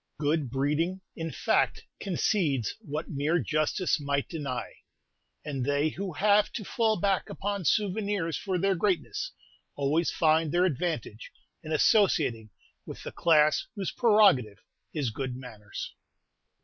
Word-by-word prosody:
Good 150 -2 0
breeding, 150 +8 0
in 165 0 -4
fact, - - +1 0.2
concedes 165 - 0
what 150 +2 -5
mere 150 +3 +1
justice 155 - 0
might 140 -1 -1
deny; 140 -7 -5 0.7
and 140 -4 -3
they 145 +3 +1
who 190 +2 -5
have 205 +3 +3
to 215 - -5
fall 225 0 +1
back 195 0 +1
upon 200 -2 -3
"souvenirs" 200 -4 0
for 190 -2 -2
their 195 +2 +2
greatness, 185 0 -1 0.4
always 150 +4 +1
find 160 -1 +2
their 175 +1 +3
advantage 150 - -3 0.3
in 155 - -8
associating 150 - +3 0.3
with - - -9
the - - -6
class 155 -3 +3
whose 195 -3 -3
prerogative 205 - +4 0.3
is 140 -7 -2
good 130 +2 -4
manners. 110 -5 -8
160 Hz, 130 wpm, -28 LUFS, 140-190 Hz, 0.7 s, prerogative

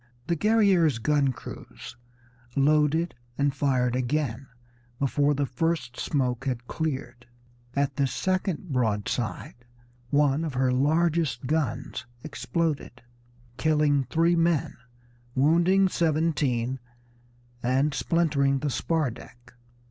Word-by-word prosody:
The 170 - 0
Guerrière's 195 - +3
gun 140 +2 +2
crews - - -10 0.6
loaded 150 +4 +2 0.2
and 140 -1 +1
fired 125 -3 +1
again 130 0 -1 0.5
before 145 +2 +1
the 140 0 0
first 135 -2 -2
smoke 130 -3 -1
had 125 -3 -2
cleared; 130 -6 -4 0.5
at 140 -1 0
this 135 -2 +1
second 185 -2 -1
broadside 115 -1 -1 0.6
one 145 +2 +2
of 155 -5 -4
her 130 0 +2
largest 155 -1 +1
guns 150 -6 -2 0.2
exploded, 155 -4 -3 0.5
killing 150 -3 +2
three 165 +4 +2
men, 165 -3 +1 0.6
wounding 170 +7 +4
seventeen, 150 -7 0 0.8
and 135 +4 +1
splintering 140 -3 +1
the 145 +1 -2
spar 155 -2 0
deck. 120 +2 -14
145 Hz, 105 wpm, -26 LUFS, 130-160 Hz, 0.8 s, wounding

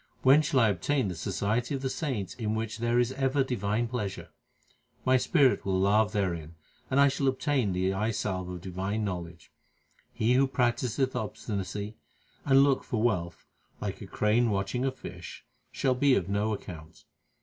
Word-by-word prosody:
When 135 +4 +7
shall 145 -4 +2
I 115 - +5
obtain 105 - 0
the 90 - -4
society 115 - -1
of 135 - -5
the - - +1
saints 130 - -3
in 110 -3 -2
which 110 0 -3
there 120 +1 +1
is 120 +1 +2
ever 135 +1 +1
divine 115 -2 -1
pleasure? 110 -5 -4 0.8
My 130 0 +4
spirit 135 0 +3
will 95 -1 0
lave 105 +2 +3
therein, 85 -6 -2 0.3
and 135 - +2
I 140 - +7
shall 135 0 0
obtain 130 -4 +1
the 95 +1 0
eye 105 +3 0
salve 95 -4 -2
of 90 -1 -6
divine 95 +4 -3
knowledge. 85 -3 -6 0.6
He 115 +3 +1
who 135 +2 +4
practiseth 125 0 0
obstinacy, 105 -1 -4 0.5
and 135 -1 +6
looketh 140 -1 +1
for 120 - -1
wealth, 90 -8 -1 0.3
like - - -4
a - - -7
crane 115 +3 +2
watching 100 +5 -1
a 135 - +1
fish, - - -10 0.3
shall 130 -2 +1
be 135 +1 +3
of 90 - 0
no 100 +2 0
account. 80 -6 -8
110 Hz, 170 wpm, -29 LUFS, 95-130 Hz, 0.8 s, When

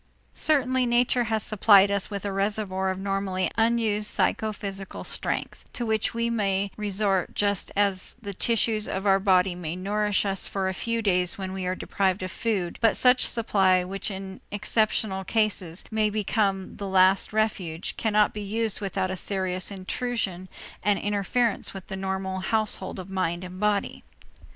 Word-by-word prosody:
Certainly 260 -4 +2
nature 240 0 +2
has 220 -1 -1
supplied 200 -2 +5
us 200 -1 +1
with 200 -1 -5
a 200 - -1
reservoir 195 -1 0
of 190 - -2
normally 195 -1 -1
unused 225 -2 +1
psychophysical 200 -4 -2
strength, - - -3
to 240 - -3
which 220 -1 0
we 230 0 0
may 200 -3 0
resort 200 -2 0
just 205 -2 0
as 195 -2 +1
the 205 -4 -6
tissues 220 +1 +1
of 190 +1 -3
our 195 -1 +4
body 190 -2 +3
may 175 -2 -5
nourish 205 +2 0
us 195 -1 +1
for 195 -1 -2
a 190 - -1
few 230 +4 -2
days 180 0 +3
when 190 -1 -5
we 190 -1 -4
are 185 - -1
deprived 190 0 -1
of 185 - -4
food, 195 -7 -2
but 225 -2 +4
such 250 0 +4
supply, 190 -5 +2
which 195 +3 -4
in 190 -1 -7
exceptional 210 -1 0
cases 195 -5 0
may 215 -1 +2
become 200 -2 -1
the 200 - -5
last 190 0 +4
refuge, 195 -6 -2
cannot 210 -1 +2
be 210 - -5
used 215 +1 -2
without 190 -1 -2
a - - -2
serious 185 -1 0
intrusion 190 -1 -3 0.3
and 205 0 +2
interference 205 +2 -1
with 190 - -8
the 190 - -6
normal 190 0 -3
household 215 +3 0
of 190 0 -8
mind 180 -2 -1
and 185 0 -8
body. 210 -1 0
200 Hz, 165 wpm, -26 LUFS, 190-215 Hz, 0.3 s, supplied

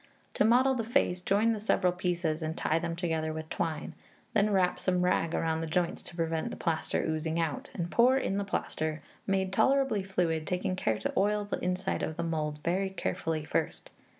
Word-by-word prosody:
To - - +2
model 250 +4 +5
the 240 -3 -1
face, 220 -6 +1
join 205 +5 +3
the 215 - -3
several 185 -4 +2
pieces, 175 -3 -1
and 160 +1 -3
tie 160 - +1
them 170 0 -3
together 160 -2 -1
with 155 0 -6
twine; 160 -3 -2 0.4
then 210 -1 +3
wrap 185 -3 +2
some 180 -1 +1
rag 165 -2 +1
round 160 0 0
the 165 - -3
joints, 175 +2 0
to - - -10
prevent 165 -1 -1
the - - -7
plaster 160 -1 -1
oozing 160 +1 -1
out, 160 -4 -2
and 170 -1 -3
pour 250 +3 +5
in 195 -7 -1
the - - 0
plaster, 155 -5 -2 0.2
made 190 -1 0
tolerably 270 -3 +3
fluid, 170 -5 -1
taking 185 +1 -1
care 110 -11 0
to 110 - -3
oil 205 +1 +2
the 205 - -3
inside 185 +1 -1
of 155 - -3
the 170 - -1
mould 155 -2 -2
very 190 +3 +1
carefully 160 -4 -2
first. - - -2
180 Hz, 200 wpm, -30 LUFS, 160-195 Hz, 0.4 s, model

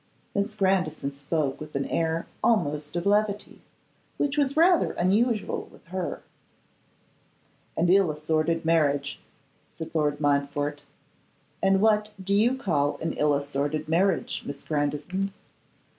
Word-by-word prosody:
Miss 205 +2 -1
Grandison 190 -7 +1
spoke 140 0 -2
with 155 -1 -9
an 140 - 0
air 165 0 -1 0.2
almost 150 -9 +1
of 175 - -2
levity, 205 0 0 0.6
which 290 -1 0
was 285 0 +1
rather 345 +1 +4
unusual 215 +5 +1
with - - -19
her. 185 -1 -4 1.5
'An 165 - +2
ill 190 0 +5
assorted 155 +2 0
marriage,' 145 -4 +1 0.5
said 160 - -8
Lord 150 -2 +1
Montfort. 145 0 0 0.8
'And 195 0 +3
what 210 -1 +3
do 195 +1 -1
you 235 +6 +3
call 150 - 0
an 165 - -2
ill 150 -1 +2
assorted 145 +2 -2
marriage, 175 +3 +1
Miss 140 0 -6
Grandison? 150 +6 -2
165 Hz, 125 wpm, -26 LUFS, 145-200 Hz, 1.5 s, ill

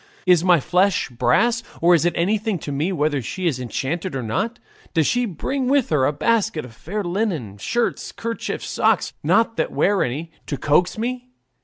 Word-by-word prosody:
Is 180 -3 +5
my 180 -3 +5
flesh 180 +4 +1
brass? 225 - +2 0.2
or 175 +2 +5
is 170 -1 +3
it 175 - +2
anything 205 +3 0
to 150 - -6
me 150 +7 -1
whether 150 -5 0
she 185 +10 -5
is 145 -7 +1
enchanted 140 +8 -3
or 130 - -2
not? 200 - -2 0.4
Does 160 -2 +3
she 245 - +1
bring 255 - -2
with 275 -1 +2
her 145 -4 +2
a - - +2
basket 210 - 0
of 120 - -12
fair 200 - -4
linen, 175 - -2
shirts, 240 - -1
kerchiefs, 230 0 -4
socks - - +1
not 225 0 +2
that - - 0
wear 200 0 +2
any 150 +7 -2 0.2
to 145 - -3
coax 165 +9 +2
me? 250 +2 -3
175 Hz, 185 wpm, -22 LUFS, 145-225 Hz, 0.4 s, Is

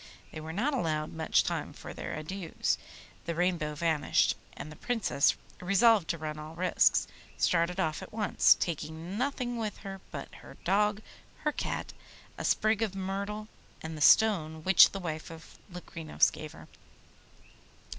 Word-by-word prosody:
They 155 - -7
were 160 +1 -6
not 240 - 0
allowed 155 - -1
much 160 -1 +2
time - - -3
for - - -9
their - - -5
adieus; 165 +2 -2 0.5
the 170 - -2
Rainbow 170 -3 0
vanished, 160 -1 +2 0.2
and 155 - -7
the - - -10
Princess, 225 - +1 0.3
resolved 200 0 +4
to 170 - -1
run 155 -1 -5
all 155 +1 -8
risks, 180 +1 +3 0.3
started 175 +2 +1
off 155 -4 0
at - - -9
once, 215 -1 +4
taking 160 +2 -4
nothing 250 -3 -1
with 215 -3 -3
her 195 -1 -6
but - - -7
her - - -13
dog, 210 +2 +2 0.4
her 300 - +2
cat, - - -4 0.4
a - - -6
sprig 215 0 +2
of 210 -4 -1
myrtle, 200 +3 -4 0.4
and 160 0 -5
the 150 - -7
stone 160 -5 +4
which 190 +1 +8
the 195 - -5
wife 160 -4 -5
of 165 0 -12
Locrinos 165 - 0
gave - - -8
her. - - -13
180 Hz, 155 wpm, -30 LUFS, 160-210 Hz, 0.5 s, which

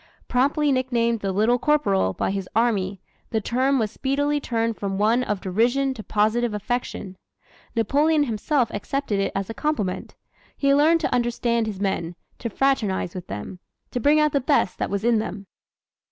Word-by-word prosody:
Promptly 285 +4 +2
nicknamed 240 -3 +1
"The 195 -2 -2
Little 220 +6 +2
Corporal" 205 - +2
by - - -1
his 195 -2 -4
army, 205 -5 +1 0.3
the 220 - 0
term 260 +5 +1
was 220 -4 0
speedily 285 +4 0
turned 230 -4 -1
from 195 -1 -3
one 225 +5 +3
of 210 -5 -2
derision 240 +8 +1
to 230 - -8
positive 215 +2 +1
affection. 210 -3 -4 0.6
Napoleon 290 +7 +3
himself 245 +1 0
accepted 215 0 -2
it 195 - 0
as 195 -1 -2
a - - -5
compliment. 225 -10 -2 0.4
He 275 -1 +3
learned 315 +4 +4
to - - -1
understand 235 -1 +1
his 205 -3 -5
men, 180 -4 -2 0.2
to 235 - -3
fraternize 215 -8 0
with 180 -2 -7
them, 105 - -7 0.3
to 245 - -2
bring 290 +5 +4
out 300 0 +3
the 280 - +1
best 260 -8 +1
that - - -1
was 200 +1 -2
in 235 -1 +3
them. 200 -2 -5
230 Hz, 170 wpm, -24 LUFS, 200-275 Hz, 0.6 s, learned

